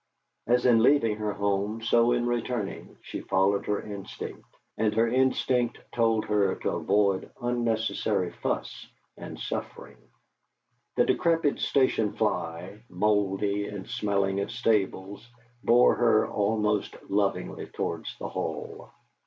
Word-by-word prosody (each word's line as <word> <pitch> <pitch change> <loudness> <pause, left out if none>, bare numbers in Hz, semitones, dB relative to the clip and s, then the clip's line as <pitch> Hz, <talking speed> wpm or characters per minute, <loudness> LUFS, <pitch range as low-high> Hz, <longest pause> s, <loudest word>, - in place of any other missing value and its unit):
As 125 +1 +3
in 120 -3 +5
leaving 115 -4 +3
her 105 -1 -2
home, 100 +3 -1
so 120 +1 +4
in 120 0 +1
returning, 120 -3 -3
she - - -6
followed 100 +1 +1
her 105 -1 0
instinct, 100 -2 -8 0.3
and 110 -1 0
her 115 +1 +3
instinct 125 -1 +1 0.2
told 115 -2 +2
her 100 -2 +1
to - - -2
avoid 100 -1 +1
unnecessary 110 -6 0
fuss - - -4 0.3
and - - -9
suffering. - - -6 1.0
The - - +4
decrepit 165 -4 +1
station 130 -6 +2
fly, 85 +5 -2
mouldy 100 +1 0
and 100 -2 -7
smelling 100 -4 0
of 100 - -2
stables, 105 -2 -1 0.3
bore 120 +1 +5
her 115 -3 +3
almost 105 0 0
lovingly 100 0 -1
towards - - -4
the - - -5
Hall. - - -5
105 Hz, 120 wpm, -27 LUFS, 100-120 Hz, 1.0 s, in